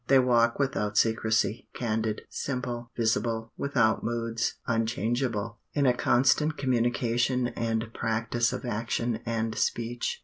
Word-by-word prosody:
They 135 - +6
walk 120 -2 +3
without 105 -7 -1
secrecy, 110 0 +1
candid, 110 -2 -1
simple, 125 -3 -4
visible, 115 0 0
without 115 -6 +1
moods, 115 0 -1
unchangeable, 115 -1 -1
in 145 -2 +2
a 125 - +5
constant 135 +5 +3
communication 125 -1 +1
and 115 -1 -2
practice 115 +1 0
of - - -5
action 115 0 -1
and 115 -1 -1
speech. 120 +2 -1
115 Hz, 115 wpm, -28 LUFS, 115-125 Hz, -, They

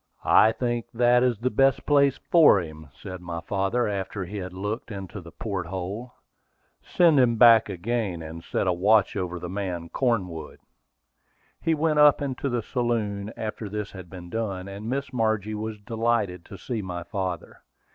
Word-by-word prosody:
"I 110 - +6
think 120 0 -2
that 120 +1 +4
is 125 -3 +2
the 125 +4 -1
best 135 -2 +2
place 140 -2 +4
for 160 - +7
him," 80 -3 -8
said 90 +6 -9
my 85 -1 -5
father, 100 +7 0
after 95 -1 -3
he 100 +4 -7
had 95 -1 -5
looked 105 +7 -4
into 100 -1 -7
the 85 -1 -12
port 95 -4 -4
hold. 95 +7 -5 0.7
"Send 165 -5 +4
him 120 -2 +4
back 115 -2 +7
again, 100 -2 -2
and 80 +1 -8
set - - -1
a 90 - +2
watch 100 +3 +3
over 90 -3 -3
the 90 - -6
man 90 -3 -4
Cornwood." 95 -11 -2 1.1
We 165 - +2
went 155 0 +1
up 150 -1 +7
into 140 -1 -3
the 120 -3 -1
saloon 110 -4 -2
after 110 -1 -5
this 105 0 -4
had 95 -4 -10
been 90 -1 -10
done, 100 -5 -3
and 100 +3 -7
Miss 135 +2 -3
Margie 110 -3 0
was 110 0 -4
delighted 110 -5 -1
to 100 - -10
see 115 +4 -4
my 90 -3 -5
father. 95 -1 -5
105 Hz, 175 wpm, -25 LUFS, 95-120 Hz, 1.1 s, for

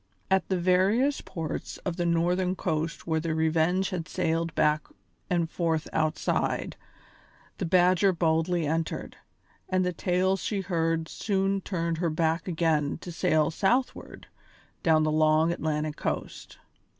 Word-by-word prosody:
At 190 0 +2
the 190 - +1
various 190 +10 +2
ports 160 -4 -5
of 180 -3 -1
the 175 0 -1
northern 180 +2 +1
coast 165 -2 -2
where 160 -1 0
the 160 0 -2
Revenge 160 +4 +1
had 175 -3 -4
sailed 165 -2 -1
back 150 0 +2 0.4
and 170 -2 +1
forth 160 -2 -1
outside, 155 -1 0 0.8
the - - -1
Badger 185 +2 +4
boldly 165 0 +1
entered, 160 +2 -3 0.5
and 185 0 +1
the 180 - -1
tales 185 +2 0
she 200 -3 -2
heard 165 -3 -1
soon 195 0 -1
turned 170 -4 -2
her 170 -1 +1
back 160 +2 0
again 160 -4 +1
to 175 - -7
sail 160 -3 +2
southward 245 +10 -1 0.6
down 160 -2 +4
the 155 - +1
long 155 +1 +3
Atlantic 155 -2 -2
coast. - - -4
170 Hz, 140 wpm, -27 LUFS, 160-185 Hz, 0.8 s, Badger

